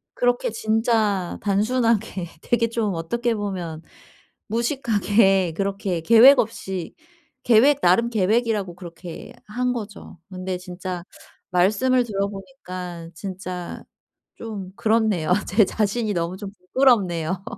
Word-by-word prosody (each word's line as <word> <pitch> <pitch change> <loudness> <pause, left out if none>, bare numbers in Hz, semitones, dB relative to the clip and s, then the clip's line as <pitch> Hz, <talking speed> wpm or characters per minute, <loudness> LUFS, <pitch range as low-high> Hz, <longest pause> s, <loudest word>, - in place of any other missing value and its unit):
그렇게 245 -1 +1
진짜 220 -4 0
단순하게 215 -2 0
되게 230 -1 +1
좀 220 -4 -1
어떻게 235 +9 -1
보면 180 -6 -4 0.7
무식하게 210 - +2
그렇게 195 -3 -2
계획 230 - +7
없이 190 -5 -3 0.5
계획 260 +5 +5
나름 190 +7 +4
계획이라고 215 -3 0
그렇게 170 -1 -10
한 250 +3 -1
거죠. 205 -6 -8
근데 185 0 -4
진짜 180 -1 -6 0.5
말씀을 215 +8 +3
들어 200 -3 -1
보니깐 180 -6 -8
진짜 185 -1 -6 0.5
좀 200 -5 -7
그렇네요. 215 -7 +2
제 205 +3 +4
자신이 215 +2 -1
너무 170 +1 -2
좀 200 -1 -7 0.2
부끄럽네요. 190 -9 +2
200 Hz, 255 characters per minute, -23 LUFS, 180-230 Hz, 0.7 s, 계획